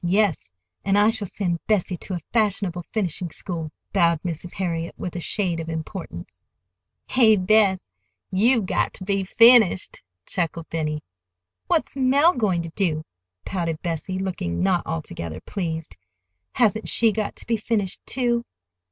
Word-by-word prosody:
"Yes; 180 - +1 0.3
and 195 0 +2
I 210 +2 +5
shall 220 -3 +2
send 175 -3 -2
Bessie 195 -4 +1
to 185 - -5
a - - -3
fashionable 200 -5 +1
finishing 180 -4 -2
school," 165 -2 -6 0.2
bowed 170 -4 +3
Mrs. 175 0 -4
Harriet, 170 -3 -2
with 180 - -5
a - - -2
shade 175 -1 -1
of 165 0 -5
importance. 160 - -7 0.6
"Hey, 230 -4 +5
Bess, 195 - +3 0.4
you've 220 +3 +3
got - - 0
ter 185 - -7
be 195 0 0
finished," 225 -1 +5 0.2
chuckled 165 -2 -2
Benny. 150 -2 -2 0.6
"What's - - 0
Mell 280 +6 +4
going 195 -8 0
to 165 - -6
do?" 160 -3 -1 0.4
pouted 165 -4 -2
Bessie, 175 +2 -3
looking 185 - -2
not 185 -2 +1
altogether 115 - -5
pleased. 165 -5 -4 0.6
"Hasn't 220 -2 +2
she 230 -1 +4
got 215 -1 -3
to - - -9
be 230 - +1
finished, 210 -3 -2
too?" 240 -2 0
185 Hz, 145 wpm, -24 LUFS, 165-215 Hz, 0.6 s, I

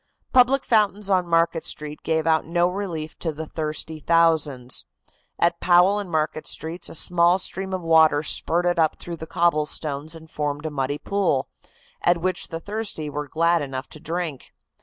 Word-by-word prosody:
Public 255 +2 +4
fountains 210 -2 +2
on 185 -2 +2
Market 165 -1 +2
Street 150 0 -4
gave 160 -1 0
out 160 -1 +3
no 175 +1 +1
relief 180 -5 -5
to 165 - -2
the 155 +1 -6
thirsty 155 0 -3
thousands. 155 -6 +1 0.5
At 170 0 +2
Powell 180 +3 +4
and 200 -3 -6
Market 155 -1 -1
Streets 165 +3 -4
a - - -7
small 175 +2 +3
stream 190 0 -2
of 185 -1 -2
water 160 -2 +5
spurted 175 +2 0
up 160 -1 +2
through 170 -1 -7
the 160 - -8
cobblestones 155 -2 0
and 160 0 -12
formed 145 0 -3
a 155 - -2
muddy 145 0 -2
pool, 180 -8 0 0.5
at 175 0 +3
which 185 +2 -2
the 165 - -5
thirsty 200 -6 -4
were 150 0 -4
glad 170 +3 +2
enough 135 -1 -5
to 155 - -9
drink. 165 -4 -4
165 Hz, 170 wpm, -23 LUFS, 155-175 Hz, 0.5 s, water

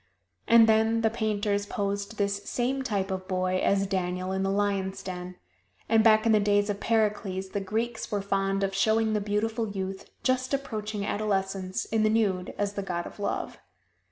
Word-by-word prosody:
And 230 -1 +7
then 220 +1 +3
the 220 -1 +2
painters 205 -2 -1
posed 200 0 -3
this 200 0 0
same 260 +2 0
type 200 -6 -1
of 185 0 -4
boy 185 0 0
as 195 +1 +2
Daniel 185 -1 -2
in 190 0 -1
the 195 - 0
lions' 195 -1 -1
den; 180 -1 -6 0.5
and 225 0 +4
back 215 0 +5
in 225 - +4
the 215 - +5
days 205 0 +2
of 200 - -5
Pericles, 205 -4 0
the 200 - -2
Greeks 220 +3 -2
were 205 -2 -1
fond 195 0 0
of 195 0 0
showing 220 +2 +2
the 210 - +1
beautiful 220 +2 -1
youth, 190 -1 -5
just 255 +1 +1
approaching 215 -6 -4
adolescence, 195 -3 -1
in 220 -1 0
the 215 - +3
nude, 200 -5 0
as 205 0 -1
the 200 - -3
god 175 -3 -3
of - - -10
Love. 200 - -3
205 Hz, 185 wpm, -27 LUFS, 195-220 Hz, 0.5 s, And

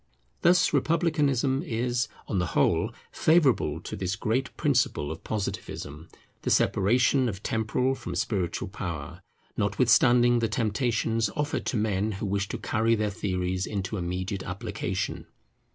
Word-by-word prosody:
Thus 175 -1 +4
Republicanism 145 -3 +2
is, 120 +1 -1 0.2
on 100 - 0
the 90 - -2
whole, - - +2 0.2
favourable 130 - +3
to - - -6
this 95 0 -2
great 115 +5 -2
principle 125 - +1
of 80 - -8
Positivism, 85 -7 -5 0.3
the - - -2
separation 125 +5 +3
of 100 -1 -7
temporal 115 +4 0
from - - -6
spiritual 95 -2 -1
power, 85 -3 -6 0.3
notwithstanding 120 +3 +4
the 115 - +1
temptations 115 0 0
offered 145 0 -2
to 120 - 0
men 105 0 0
who 100 +2 -4
wish 100 0 -1
to - - -4
carry 115 +1 +1
their 105 -1 -1
theories 95 -1 -2
into 100 -1 -3
immediate 95 +2 -3
application. 95 0 -4
110 Hz, 135 wpm, -27 LUFS, 95-125 Hz, 0.3 s, Thus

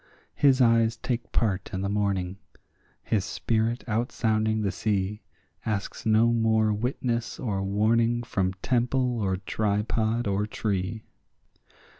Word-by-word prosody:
His 135 -2 +4
eyes 115 -1 +4
take 120 0 -3
part 100 -4 0
in 95 - -2
the 100 - -1
morning; 100 -2 -1 0.6
his 105 -4 0
spirit 115 +4 -1
out 115 +2 -1
sounding 110 -1 +1
the 100 - 0
sea 100 +1 -1 0.4
Asks 105 0 -3
no 110 +2 +4
more 110 -2 +2
witness 120 +1 -2
or 100 -6 -2
warning 115 +4 +2
from 95 -5 -1
temple 125 -1 +1
or 95 -2 0
tripod 110 +3 0
or 100 +1 0
tree. 105 0 -2
110 Hz, 125 wpm, -27 LUFS, 100-115 Hz, 0.6 s, His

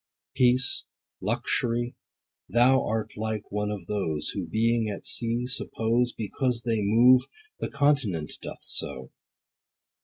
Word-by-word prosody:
Peace, 125 0 +3 0.4
Luxury, 120 +2 -1 0.6
thou 125 +2 +4
art 110 0 -2
like 110 -1 -4
one 105 0 -1
of 100 -4 -5
those 85 -7 -2
60 - - -4
Who, 90 - -4
being 115 +1 +1
at 100 - -6
sea, 120 +1 0
suppose, 120 -1 0
Because 115 +2 -2
they 115 -3 0
move, 120 +5 +6 0.4
the - - -3
continent 135 - +1
doth - - -8
so. 65 -2 -4
115 Hz, 125 wpm, -27 LUFS, 105-125 Hz, 0.6 s, move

